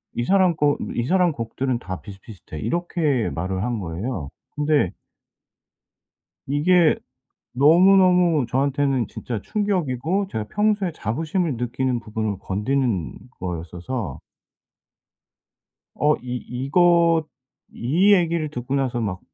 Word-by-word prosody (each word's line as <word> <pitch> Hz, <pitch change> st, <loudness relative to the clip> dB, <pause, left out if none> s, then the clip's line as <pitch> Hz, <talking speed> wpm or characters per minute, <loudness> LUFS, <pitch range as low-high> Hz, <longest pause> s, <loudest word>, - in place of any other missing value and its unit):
"이 120 Hz, -, -1 dB
사람 185 Hz, 0 st, +3 dB
거 145 Hz, -1 st, +2 dB, 0.2 s
이 120 Hz, -, -1 dB
사람 180 Hz, +2 st, +3 dB
곡들은 120 Hz, +1 st, -2 dB
다 95 Hz, -5 st, -6 dB
비슷비슷해." 95 Hz, -5 st, -11 dB
이렇게 160 Hz, -, 0 dB
말을 95 Hz, +3 st, -3 dB
한 120 Hz, -3 st, -2 dB
거예요. 90 Hz, -, -4 dB, 0.3 s
근데 150 Hz, -, +2 dB, 1.6 s
이게 160 Hz, +4 st, +4 dB, 0.6 s
너무너무 175 Hz, +1 st, +5 dB
저한테는 135 Hz, -1 st, +1 dB
진짜 115 Hz, -5 st, -5 dB
충격이고 185 Hz, -, -1 dB
제가 110 Hz, -1 st, -3 dB
평소에 210 Hz, -4 st, +1 dB
자부심을 160 Hz, -, -2 dB
느끼는 125 Hz, +1 st, -1 dB
부분을 110 Hz, -3 st, -3 dB
건드는 105 Hz, -, -1 dB, 0.2 s
거였어서 90 Hz, -, -5 dB, 1.8 s
어 150 Hz, +1 st, +3 dB
이 125 Hz, 0 st, -5 dB
이거 165 Hz, +5 st, +3 dB, 0.5 s
이 175 Hz, -, +3 dB
얘기를 170 Hz, -4 st, +1 dB
듣고 130 Hz, 0 st, -4 dB
나서 130 Hz, -3 st, 0 dB
막 95 Hz, -4 st, -3 dB
135 Hz, 240 characters per minute, -23 LUFS, 115-170 Hz, 1.8 s, 너무너무